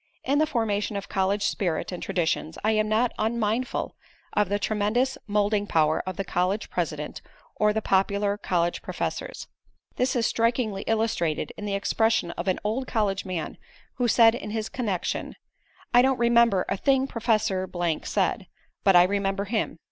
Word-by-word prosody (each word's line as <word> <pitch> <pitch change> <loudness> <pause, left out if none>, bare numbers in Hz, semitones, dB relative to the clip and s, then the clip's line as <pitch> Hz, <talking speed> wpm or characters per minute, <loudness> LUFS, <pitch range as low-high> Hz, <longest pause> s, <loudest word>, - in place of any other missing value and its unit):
In 280 +2 +1
the 310 - +3
formation 215 -6 -1
of 200 - -6
college 195 +1 0
spirit 175 -4 -1
and 180 - -6
traditions 165 -3 -1
I 215 - +3
am 215 -1 +1
not 225 +3 +2
unmindful 225 +2 -1 0.4
of 210 -3 +2
the 205 - +1
tremendous 215 +6 0
moulding 205 0 +1
power 155 -3 +2
of 185 - -4
the 195 - -2
college 185 +4 -1
president 150 -4 -3 0.3
or 210 0 +3
the 220 0 -2
popular 200 +1 +1
college 175 -4 -1
professors. - - -4 0.5
This 255 +1 +1
is 235 -2 +1
strikingly 230 -4 0
illustrated 195 -9 0
in 210 - -7
the 200 -1 -1
expression 220 -2 +1
of 170 +2 -6
an 185 - +1
old 235 +5 -1
college 205 -4 0
man, 180 -4 -4 0.4
who 245 - +1
said 225 0 +6
in 210 -3 -5
this 220 0 -3
connection: 205 -8 -3 0.6
"I 245 - +8
don't 265 0 +2
remember 235 -5 +4
a - - -1
thing 270 +5 +2
Professor 215 -7 0 0.3
said, - - -1 0.4
but 195 -2 +5
I 175 - +9
remember 195 +1 0
him." 215 -4 -2
210 Hz, 165 wpm, -26 LUFS, 190-230 Hz, 0.6 s, I